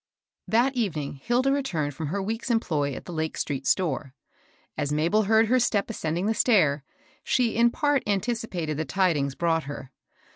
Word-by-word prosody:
HAT 240 +4 +3
evening 160 - -2
Hilda 250 - +1
returned 170 - -1
fix»a 155 +4 -5
her 195 +4 -2
week's 225 +5 -3
employ 150 - 0
at - - -9
the 175 - -7
Lake 160 -1 -3
street 135 -2 -3
store. 145 -6 0 0.6
As 145 -1 -2
Mabel 165 +8 +2
heard 220 +2 +4
her 255 +3 +3
step 220 -3 +1
ascending 170 -2 -2
the 220 - +2
V - - -7
stair, 155 - +3 0.4
she 240 -3 +1
in 235 +1 +5
part 290 +1 +1
anticipated 200 - -2
the 160 - -1
tidings 145 -3 +1
brought 165 -2 0
her. 135 -2 -8
185 Hz, 175 wpm, -26 LUFS, 150-230 Hz, 0.6 s, in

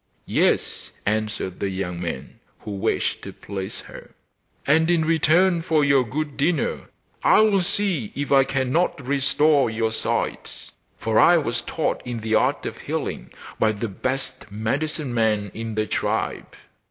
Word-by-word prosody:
'Yes,' - - +1 0.2
answered 105 -3 -2
the 100 - -1
young 90 -2 -4
man, 85 -7 -5 0.2
who 105 - -7
wished 100 -1 -1
to - - -7
please 95 0 -6
her, - - -13 0.5
'and 160 +3 +3
in 170 -2 +3
return 165 +2 +3
for 155 -3 +2
your 140 -2 +4
good 145 +5 -4
dinner 150 0 0 0.3
I - - +6
will 210 -3 +4
see 180 - 0
if 145 0 -3
I 135 -1 +6
cannot 135 +2 0
restore 140 +1 +3
your 110 0 -1
sight; 110 - -3 0.3
for 110 -1 +1
I 175 - +7
was 120 -7 -1
taught 160 - -2
in 120 -2 -5
the 110 0 -2
art - - +2
of - - -5
healing - - -4 0.3
by 110 -1 +3
the 110 +2 -4
best 130 +2 -4
medicine 135 +6 -2
man 105 -3 +1
in 115 -1 -5
the 110 0 +1
tribe. - - -2
130 Hz, 155 wpm, -23 LUFS, 110-155 Hz, 0.5 s, I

